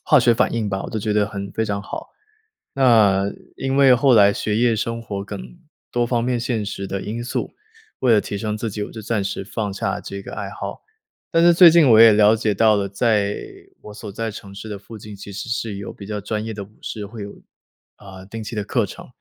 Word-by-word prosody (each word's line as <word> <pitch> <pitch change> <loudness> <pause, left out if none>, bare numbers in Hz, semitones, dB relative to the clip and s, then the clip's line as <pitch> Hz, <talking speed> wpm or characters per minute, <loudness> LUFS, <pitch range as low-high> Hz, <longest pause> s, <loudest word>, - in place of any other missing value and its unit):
化 150 - +5
学 120 -1 +4
反 115 - +1
应 110 -3 -1
吧， 95 0 -2
我 - - -5
都 110 - -3
觉 105 0 -1
得 105 -1 +2
很 100 -2 -6
非 110 - -1
常 100 -2 -3
好。 - - -7 0.6
那 110 -7 +4 0.3
因 135 0 -2
为 135 -2 +7
后 125 +1 +4
来 100 -2 +6
学 105 +1 -2
业 120 -1 +3
生 115 +1 -3
活 105 -3 -6
等 60 -9 -8 0.3
多 120 -1 0
方 120 -1 0
面 125 -1 0
现 115 -2 -2
实 100 -1 -5
的 100 0 -4
因 115 +3 -4
素， 125 - -4 0.4
为 125 -3 +3
了 105 - +4
提 100 - -5
升 105 +1 -2
自 115 +1 -3
己， 105 +1 -4
我 - - -9
就 110 - -8
暂 105 -1 -1
时 100 0 -4
放 100 0 -4
下 - - -2
这 100 0 -7
个 - - -9
爱 - - -5
好。 - - -7 0.5
但 165 -1 +3
是 175 0 +7
最 175 0 +9
近 160 -3 +5
我 110 - +7
也 115 -1 +9
了 105 +1 +5
解 105 -2 0
到 110 +1 +4
了， 100 -1 -1
在 105 0 +1 0.5
我 105 - -10
所 105 -1 -8
在 115 +2 -3
城 100 -1 -10
市 110 +2 -8
的 105 -2 -5
附 110 +3 -12
近， 105 0 -10
其 100 +1 -10
实 110 +5 -6
是 115 -3 -2
有 100 - -6
比 100 - -11
较 105 -1 -4
专 105 +1 -3
业 110 -1 -5
的 100 - -6
舞 100 - -19
社， 105 -2 -5
会 110 -2 -7
有， 100 - -11 0.6
呃， 95 -1 -12
定 110 +2 -7
期 115 - -6
的 105 - -2
课 - - 0
程， - - -10
105 Hz, 265 characters per minute, -21 LUFS, 100-115 Hz, 0.6 s, 最